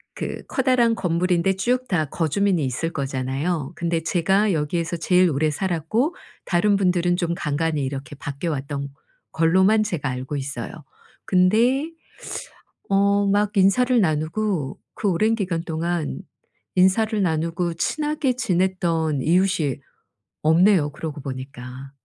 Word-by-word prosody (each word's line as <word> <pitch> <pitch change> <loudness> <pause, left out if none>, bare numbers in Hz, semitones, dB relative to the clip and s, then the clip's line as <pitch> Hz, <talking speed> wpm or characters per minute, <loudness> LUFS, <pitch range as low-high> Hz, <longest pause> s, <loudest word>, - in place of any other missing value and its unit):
그 - - -5
커다란 255 -3 +3
건물인데 180 0 +1
쭉 245 +7 0
다 165 -7 +1
거주민이 170 +1 +1
있을 130 +6 -2
거잖아요. 135 +3 -2
근데 170 -1 -1
제가 195 +5 +2
여기에서 165 +1 -1
제일 180 +2 +3
오래 155 +2 +1
살았고 190 - -1 0.3
다른 200 +4 +2
분들은 180 -2 +2
좀 170 -1 -1
간간히 150 -1 -1
이렇게 140 +3 -6
바뀌어 145 +4 -4
왔던 140 0 -4 0.4
걸로만 190 +7 +3
제가 170 -10 -2
알고 130 +3 -4
있어요. 135 -4 -4 0.5
근데 230 - +3 1.0
어 200 +1 +3
막 205 +1 +1
인사를 240 +6 +4
나누고 160 -1 -1 0.2
그 205 - -1
오랜 215 +6 +2
기간 180 -6 -2
동안 165 -1 -2 0.6
인사를 210 +4 +3
나누고 170 0 -1
친하게 300 - 0
지냈던 175 - 0
이웃이 170 -3 +2 0.7
없네요, 160 0 +4
그러고 150 -1 -6
보니까. 130 0 -8
175 Hz, 280 characters per minute, -23 LUFS, 150-200 Hz, 1.0 s, 인사를